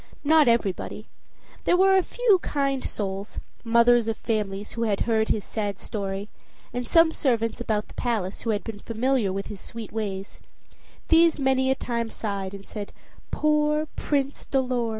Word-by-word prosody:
Not 305 -1 +5
everybody. 230 -5 0 0.6
There 355 - +4
were 385 +1 +5
a 380 - +5
few 440 -1 +2
kind 275 -2 -1
souls, 195 0 -4 0.2
mothers 235 0 +4
of 225 - -1
families, 210 -2 -2
who 230 - -5
had 210 -4 0
heard 220 -1 +1
his 210 - +1
sad 205 -3 -3
story, 195 -1 -4 0.5
and 245 -1 -3
some 330 +3 +5
servants 235 -6 0
about 215 -3 -1
the - - -15
palace, 215 -6 -2
who 230 - -3
had 210 -2 0
been 220 -3 -7
familiar 230 -1 0
with 195 +1 -3
his 205 -3 -8
sweet 230 -2 -8
ways 200 -3 -4 0.7
these 330 0 +5
many 265 -1 +2
a 265 - +3
time 235 -3 -2
sighed 200 -3 -4
and 195 0 -11
said, 205 -2 -7 0.4
"Poor 300 0 +2
Prince 280 -1 -1
Dolor!" 255 -3 0
230 Hz, 165 wpm, -25 LUFS, 205-270 Hz, 0.7 s, Not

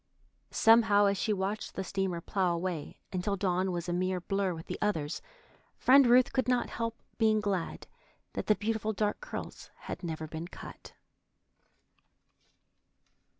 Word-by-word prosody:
Somehow, 225 -2 +5
as 200 0 +3
she 220 - 0
watched 200 +1 -2
the 190 - -2
steamer 190 -2 -2
plough 180 -1 0
away 170 -3 -4 0.2
until 185 +2 0
Dawn 185 -1 0
was 175 0 -3
a 175 - -1
mere 185 +1 0
blur 195 +1 -1
with 160 - -9
the - - -5
others, 160 -8 -1 0.6
Friend 270 0 +6
Ruth 245 +1 +5
could 260 -1 +1
not 250 -1 +1
help 230 0 -3 0.2
being 220 -1 +4
glad 200 -5 -2 0.5
that - - -4
the 215 - +5
beautiful 220 0 -1
dark 210 - -1
curls - - -7
had - - -6
never 160 -2 -4
been 160 +2 -6
cut. - - -11
200 Hz, 150 wpm, -31 LUFS, 180-220 Hz, 0.6 s, Friend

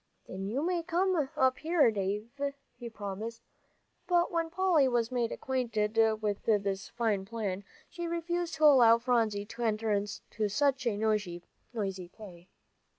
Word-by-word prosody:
Then 190 +1 -5
you 255 +8 -1
may 355 -1 0
come 345 -3 0
up 260 -1 +3
here, 320 -6 +3
Dave," 205 +2 -3 0.4
he 240 -2 -8
promised. 220 +2 -6 0.6
But 350 -1 +2
when 335 -1 -1
Polly 345 -5 +3
was 240 -1 0
made 240 -2 0
acquainted 225 -5 -1 0.3
with 205 -1 -1
this 200 -3 0
fine 225 -5 0
plan, 200 -2 -4 0.2
she 345 0 -6
refused 340 0 -2
to 310 - -3
allow 245 -6 +7
Phronsie 230 -4 0
to 235 - -9
enter 220 -1 0
into 210 +1 -2
such 275 +2 +1
a 210 -3 0
noisy 205 -5 -1 0.6
play. 180 -2 -13
230 Hz, 145 wpm, -30 LUFS, 205-290 Hz, 0.6 s, allow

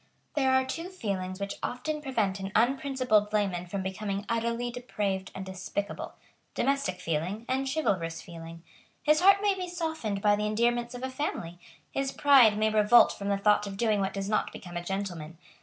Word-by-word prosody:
There 270 -3 +2
are 260 0 +3
two 330 +6 -5
feelings 190 - -4
which 200 0 -4
often 300 +5 -3
prevent 220 -9 -1
an 195 0 -5
unprincipled 255 -3 +2
layman 195 -4 0
from 190 +2 -3
becoming 195 +1 -3
utterly 235 +1 -1
depraved 205 -6 -3
and 190 - -5
despicable, 190 +2 -5 0.4
domestic 275 -8 0
feeling, 175 +8 -2
and 265 +1 0
chivalrous 185 - -1
feeling. 165 -1 -10 0.4
His 305 +2 +4
heart 395 +2 +6
may 405 -1 +4
be 370 -1 -4
softened 320 - -3
by 205 0 +4
the 210 +1 -1
endearments 240 +2 0
of 245 - -7
a 260 - -3
family. 175 - -4 0.3
His 275 0 -1
pride 265 -9 +6
may 215 0 +2
revolt 215 +2 +6
from 200 -1 -5
the 200 - +2
thought 210 +1 +3
of 195 -1 -6
doing 215 -2 +2
what 195 0 -1
does 195 0 -3
not 215 - 0
become 175 -1 -10
a 175 - -3
gentleman. 175 -4 -4
210 Hz, 180 wpm, -29 LUFS, 195-260 Hz, 0.4 s, heart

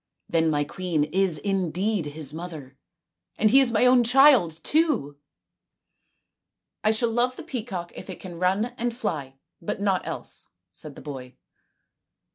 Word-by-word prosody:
" - - -55
Then 165 -1 +2
my 145 -1 +1
queen 165 0 -1
is 185 +1 +1
indeed 190 0 -1
his 145 -1 -5
mother, 160 -5 -8 0.6
and 215 0 +3
he 270 - +7
is 260 -3 +3
my 230 +2 +3
own 250 -1 +6
child 250 - +6
too! 290 - +1 0.5
" - - -51 0.2
" - - -61
I 215 - +3
shall 230 +2 +1
love 245 +2 +1
the - - -9
peacock 210 -9 -5
if - - -10
it 185 - -7
can 175 -3 -9
run 195 +7 +1
and 240 0 -2
fly, 150 - -3 0.3
but 170 - -4
not 195 -2 0
else," - - -6 0.2
said 145 - -10
the - - -11
boy. 130 -4 -8
185 Hz, 165 wpm, -25 LUFS, 155-235 Hz, 0.6 s, he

